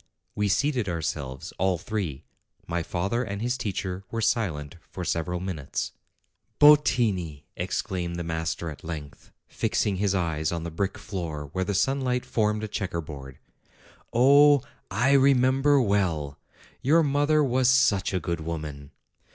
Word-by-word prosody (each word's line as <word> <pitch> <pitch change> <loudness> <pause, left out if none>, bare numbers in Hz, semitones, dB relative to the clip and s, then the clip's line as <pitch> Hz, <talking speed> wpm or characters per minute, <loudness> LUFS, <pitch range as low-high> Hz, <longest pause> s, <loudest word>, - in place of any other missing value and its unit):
We 105 0 0
seated 125 +1 +1
ourselves, 75 -5 -4
all 95 0 +2
three. 90 -7 -4 0.4
My 85 0 -2
father 95 +8 -1
and 100 -3 -5
his 120 +3 -1
teacher 95 -5 -3
were 115 - -3
silent 85 - -1
for 90 - -6
several 90 +2 -1
minutes. 90 -7 -4 0.7
"Bottini!" 110 - +4
exclaimed 85 -2 -3
the 85 - -3
master 80 0 -3
at 75 - -12
length, 75 -3 -8 0.2
fixing 100 -2 0
his 100 0 +1
eyes 80 -4 -1
on 85 -1 -3
the 85 - -5
brick 95 +4 -2
floor 80 -8 -5
where 95 0 -1
the 100 - -2
sunlight 125 +3 +1
formed 105 -1 0
a - - -2
checker 95 -4 -3
board. 70 -4 -8 0.7
"Oh! 140 +3 +6 0.3
I 120 +7 +2
remember 135 +1 +4
well! 85 - 0 0.4
Your 160 +5 +4
mother 145 +1 +3
was 130 -1 +2
such 130 -7 +3
a 95 - 0
good 85 -2 -3
woman 75 -3 -6
95 Hz, 145 wpm, -26 LUFS, 80-125 Hz, 0.7 s, Oh